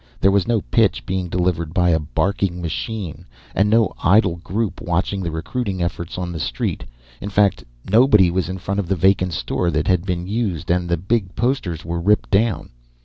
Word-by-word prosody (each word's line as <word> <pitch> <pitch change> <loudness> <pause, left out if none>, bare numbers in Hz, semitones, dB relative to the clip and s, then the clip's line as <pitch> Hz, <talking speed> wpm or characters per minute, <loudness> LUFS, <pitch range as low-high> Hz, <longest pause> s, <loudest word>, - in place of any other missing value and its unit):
There 95 - +4
was 100 0 +2
no 115 -3 +2
pitch 110 -1 +1
being 95 -2 -2
delivered 85 -2 -1
by 90 -1 +3
a 80 - +3
barking 90 +4 -1
machine, 90 +1 -4 0.3
and 100 +2 +2
no 110 -2 +3
idle 95 -2 +4
group 100 +5 -3
watching 95 +3 -1
the 85 - -2
recruiting 95 +5 -3
efforts 85 +1 -4
on 90 -1 -3
the 85 - -5
street. - - -2 0.4
In 100 - -4
fact, 100 0 +2 0.2
nobody 105 -4 +5
was 90 0 -1
in 95 - -4
front 100 +2 -3
of 100 - -2
the 95 - +1
vacant 95 0 +2
store 85 +4 -1
that 75 -2 0
had 90 -2 +2
been 90 -2 -3
used, 95 -5 -2
and 90 0 0
the 85 - +1
big 95 +2 -1
posters 110 - -1
were 85 0 -3
ripped 105 +4 +2
down. 105 +1 +1
95 Hz, 195 wpm, -21 LUFS, 85-100 Hz, 0.4 s, nobody